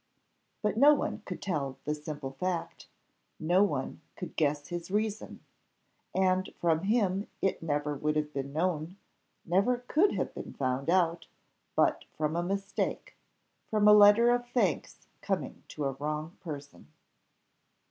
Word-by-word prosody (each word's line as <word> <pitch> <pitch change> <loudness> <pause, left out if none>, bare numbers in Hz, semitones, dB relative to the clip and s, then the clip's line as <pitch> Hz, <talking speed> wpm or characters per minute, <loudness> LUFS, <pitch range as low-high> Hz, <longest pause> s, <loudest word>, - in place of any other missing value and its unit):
But 210 0 0
no 290 +4 +7
one - - -3
could - - -6
tell 140 -8 -2
the 150 - 0
simple 150 -2 -6
fact, 175 +5 -4 0.5
no 175 +4 +3
one 145 -9 -2
could 175 -3 -7
guess 145 -1 0
his 175 0 -5
reason, 210 +1 -2 0.7
and 185 0 +2
from 165 +1 +1
him 200 -2 +1
it 195 - 0
never 150 -2 -1
would 150 +2 -1
have 150 0 -1
been 140 0 -4
known 165 +2 -1 0.5
never 200 +8 +2
could 365 +7 +3
have - - -2
been - - -7
found 130 +2 -1
out, 170 -2 +2 0.5
but - - +2
from 155 +1 0
a 170 - +1
mistake 195 +3 -3 0.5
from 210 -1 +3
a 210 - +9
letter 210 +3 +7
of 245 0 0
thanks 215 - -1 0.2
coming - - -3
to 150 - -4
a 135 - +1
wrong 150 +4 -4
person. 145 - -8
170 Hz, 145 wpm, -30 LUFS, 150-200 Hz, 0.7 s, a